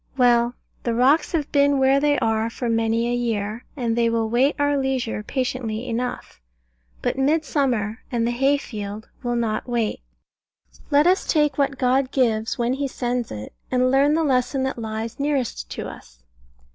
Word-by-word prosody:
Well, 240 -1 +4 0.3
the 235 -1 -1
rocks 275 +6 +3
have 305 -4 -1
been 285 -1 +4
where 265 +1 +4
they 290 0 +2
are 225 -1 +1
for 240 +1 -4
many 230 0 +1
a 240 - 0
year, 225 -2 -2
and 235 -3 0
they 235 -1 +2
will 230 -1 0
wait 260 +5 +3
our 290 0 +2
leisure 265 -5 -1
patiently 245 -1 -3
enough: 245 - -4 0.6
but - - -1
Midsummer 270 -7 +1
and 235 -2 0
the 240 - +1
hay 270 +4 +2
field 210 -5 -7
will 240 -2 -1
not 230 0 -1
wait. 235 -3 -1 0.9
Let 295 0 +4
us 370 +2 +3
take 295 -3 +2
what 275 -1 +1
God 255 +1 +2
gives 225 -5 +1
when 240 +1 +1
He 280 +1 -1
sends 245 -2 -2
it, 105 0 -7 0.2
and 255 0 +2
learn 280 +3 +4
the 325 - +2
lesson 260 -1 +1
that 265 -2 -2
lies 220 +1 -5
nearest 270 - -1
to - - -5
us. - - -13
250 Hz, 170 wpm, -23 LUFS, 230-275 Hz, 0.9 s, Well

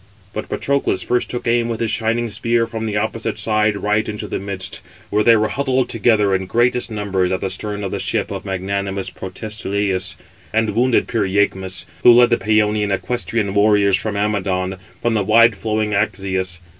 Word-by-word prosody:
But 110 - -5
Patroclus 140 0 0
first 125 0 0
took 120 - -4
aim 120 0 +2
with 115 -1 -3
his 115 -2 0
shining 115 +1 0
spear 115 +1 +1
from 110 -1 -5
the 105 -1 -2
opposite 110 +2 -2
side 105 -1 +1
right 105 +2 0
into 105 0 -5
the - - -3
midst, 100 -1 -4 0.3
where 105 +1 +2
they 115 +1 +6
were 110 0 +1
huddled 130 -2 0
together 105 -3 +2
in 95 0 -1
greatest 120 +4 +1
numbers 100 -4 -1
at 95 - 0
the 95 - -2
stern 105 +2 -3
of 95 - -3
the - - -3
ship - - -1
of - - -5
magnanimous 95 0 -3
Protesilaus, 100 -1 -2 0.4
and 110 -1 +1
wounded 120 +3 +2
Pyræchmes, 95 -3 0 0.2
who 120 - +8
led 120 0 +5
the 120 - +4
Pæonian 105 0 +1
equestrian 100 +1 -1
warriors 100 -1 +4
from 105 +1 -2
Amydon, 95 -2 -1 0.3
from 120 - +2
the 110 - +1
wide 115 +2 +5
flowing 110 0 -1
Axius. 95 -2 -1
105 Hz, 180 wpm, -19 LUFS, 100-115 Hz, 0.4 s, who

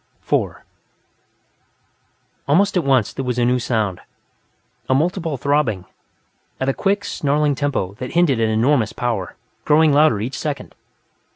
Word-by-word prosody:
4 - - -2 1.8
Almost 195 +8 +3
at 180 - +2
once, 130 -6 +2
there 135 - -4
was 125 -1 -2
a 120 - +2
new 125 +1 +2
sound 110 -7 -1 0.9
a 130 - +3
multiple 165 0 -1
throbbing, 125 -9 0 0.7
at 130 - -1
a 135 - +2
quick, 200 +4 0
snarling 145 0 0
tempo 135 -9 -2
that 125 - -6
hinted 170 -8 +3
at 110 -1 +2
enormous 110 0 +2
power, 115 -6 -3 0.3
growing 155 0 +4
louder 150 -6 +4
each 120 +6 -4
second. 145 -3 -4
135 Hz, 135 wpm, -20 LUFS, 115-150 Hz, 1.8 s, growing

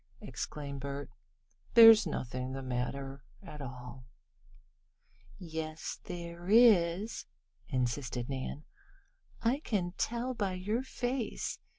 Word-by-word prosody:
exclaimed 140 -2 -5
Bert 140 0 -5 0.6
"There's 225 -4 +10
nothing 130 -3 -3
the 135 0 -5
matter 135 +2 -3 0.2
at 150 -5 -9
all." 125 -1 -8 1.3
"Yes 160 -2 -5
there 170 +1 -7
is," 210 -3 +5 0.4
insisted 125 -1 -1
Nan. 135 +2 -4 0.8
"I 240 +5 +2
can 195 - -1
tell 240 +2 -1
by 200 -5 -1
your 205 +6 -1
face. 250 -2 -3
160 Hz, 95 wpm, -32 LUFS, 135-215 Hz, 1.3 s, There's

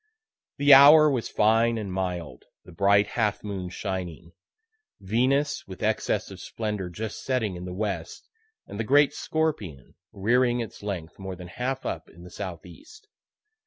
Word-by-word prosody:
The 145 0 +6
hour 150 +3 +9
was 125 -4 -2
fine 115 +2 +2
and 100 -4 -5
mild, 90 -8 -4 0.2
the - - -13
bright 100 +4 +3
half 110 -3 -1
moon 95 -3 -5
shining; 90 -3 -5 0.7
Venus, 130 +8 0
with 95 -1 -9
excess - - -1
of - - -10
splendor, 105 -5 -4
just 110 +5 -6
setting 115 -8 -1
in 90 +1 -7
the 90 - -6
west, 95 -5 -4 0.4
and 100 - -9
the - - 0
great 140 +5 +4
Scorpion 110 - -3 0.2
rearing 120 +4 +1
its 115 -3 -6
length 95 -5 -6
more 95 -1 -6
than 90 0 -10
half 130 +6 -4
up - - -5
in 85 +1 -16
the 90 - -12
southeast. 95 - -10
105 Hz, 155 wpm, -26 LUFS, 90-125 Hz, 0.7 s, hour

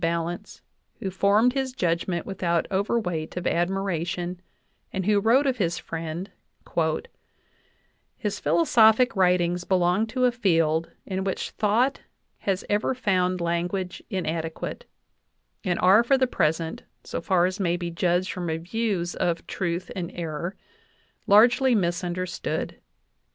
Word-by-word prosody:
VIII 165 - +2
balance, 170 +4 -3 0.4
who 190 - -3
formed 205 +6 +3
his 265 -1 -2
judgment 170 -4 -1
without 170 -3 0
overweight 190 -5 -1
of 180 - -3
admiration, 175 -1 -1 0.5
and 190 -2 -3
who 210 0 +4
wrote 235 +7 +4
of 265 -2 +1
his 170 -5 0
friend: 165 +4 -5 1.9
"His 210 -3 -3
philosophic 220 - +4
writings 180 -2 +2
belong 185 +3 +2
to 255 +3 +1
a 250 - +4
field 165 -8 +1 0.2
in 190 -1 -2
which 190 -1 -3
thought 235 +6 +1 0.4
has 195 -2 -1
ever 210 +5 +1
found 185 -6 +1
language 175 +2 -2
inadequate, 165 - -3 0.8
and 180 -4 0
are 195 +5 +6
for 270 +3 +3
the 260 - +3
present, 160 -7 -1 0.2
so - - -4
far 175 0 +3
as 185 +2 -2
may 175 -2 +1
be 175 -1 -4
judged 175 +2 +1
from 180 -1 -4
reviews 175 +2 -2
of 170 -1 -1
'Truth 175 -1 -3
and 175 -3 -4
Error/ 170 +2 -4 0.7
largely 240 +5 +6
misunder 175 -1 -1
stood. 160 -2 -4
185 Hz, 130 wpm, -25 LUFS, 170-210 Hz, 1.9 s, are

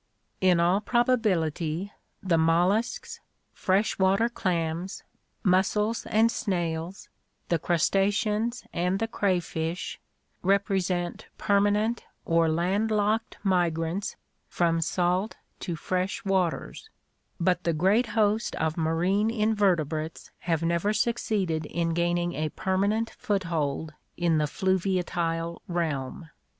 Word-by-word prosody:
— - - -45
In 175 - +3
all 180 +4 +3
probability 200 - 0 0.3
the 180 -4 +2
molluscs, 175 +8 +1 0.3
fresh 195 +3 +1
water 195 +5 +3
clams, 175 -3 -2 0.4
mussels 210 +3 +1
and 225 +2 +3
snails, 175 -5 -3 0.4
the 170 - +2
crustaceans 210 +7 +1
and 180 +2 0
the 225 +2 -1
crayfish 175 -5 -2 0.4
represent 190 -2 0
permanent 205 +3 +2 0.2
or 165 -1 +3
land 185 +7 +1
locked 215 +1 0
migrants 175 0 0 0.3
from 165 -1 +1
salt 180 +5 0 0.2
to 175 - -3
fresh 185 +6 -2
waters; 190 - -1 0.5
but 180 0 +1
the 170 - +1
great 195 +9 +2
host 215 +1 +2
of 160 +1 -1
marine 175 +6 +1
invertebrates 190 - 0
have 165 -2 -1
never 170 +5 +1
succeeded 210 -8 0
in 165 0 -1
gaining 175 +1 0
a 155 -1 -2
permanent 200 +7 0
foot 200 -2 -1
hold 155 -2 -2 0.2
in 170 -2 +2
the 150 - +2
fluviatile 175 -2 -1
realm. 160 -3 -3
180 Hz, 110 wpm, -27 LUFS, 165-205 Hz, 0.5 s, In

